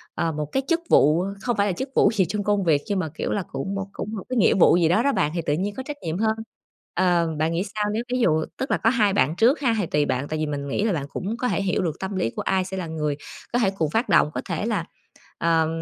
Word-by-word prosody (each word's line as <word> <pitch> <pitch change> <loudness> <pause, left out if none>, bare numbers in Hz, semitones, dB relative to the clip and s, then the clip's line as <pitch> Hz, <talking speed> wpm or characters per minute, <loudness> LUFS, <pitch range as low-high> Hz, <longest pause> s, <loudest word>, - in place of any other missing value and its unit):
ờ, 165 - 0
một 150 -1 -3
cái 270 - 0
chức 335 -1 +2
vụ 155 +5 +5 0.2
không 240 -3 -1
phải 200 - +2
là 190 - 0
chức 265 +9 -4
vụ 205 - +5
gì 195 -4 +2
trong 205 +4 -3
công 205 -1 +1
việc 155 -5 +3
nhưng 200 -2 0
mà, 160 -4 -2
kiểu - - -3
là, 200 - -1
cũng 160 +9 -3 0.2
cũng 215 +2 -5
một 195 - -5
cái 255 - -1
nghĩa 210 - +5
vụ 175 - +5
gì 170 -2 +3
đó 215 +7 +3
đó 280 - +3
bạn, 150 - +1
thì 170 - 0
tự 145 - +1
nhiên 200 +6 -2
có 260 - -5
trách 295 +2 -6
nhiệm 160 +1 -3
hơn. 220 +1 +1 0.6
Ờ, 175 -2 +2
bạn 160 +1 +1
nghĩ 170 +2 0
sao 210 -1 0
nếu 230 +2 -1
ví 255 - +1
dụ 160 -8 +2
tức 265 - -3
là - - +3
có 225 - +2
hai 215 -5 +2
bạn 140 +2 +2
trước 240 - +4
ha, 240 -5 +1
thì 205 - 0
tùy 150 -2 +1
bạn, 130 +1 -1
tại 155 +1 -3
vì 155 - 0
mình 145 -1 -4
nghĩ 140 - -1
là 220 -3 +1
bạn 145 -4 -2
cũng 200 +9 -4
có 250 - -1
thể - - 0
hiểu 195 0 0
được 165 -4 -3
tâm 190 +1 -4
lý 180 -11 0
của - - -5
ai 190 -1 +1
sẽ 190 0 -5
là 180 -3 -3
người 150 -3 -2 0.4
có 245 - +3
thể 205 -6 +3
cùng 160 -4 +1
phát 225 - 0
động, - - +5
có - - -2
thể - - -3
là, - - -1 0.5
ờm 165 -1 +2
185 Hz, 300 wpm, -24 LUFS, 160-215 Hz, 0.6 s, vụ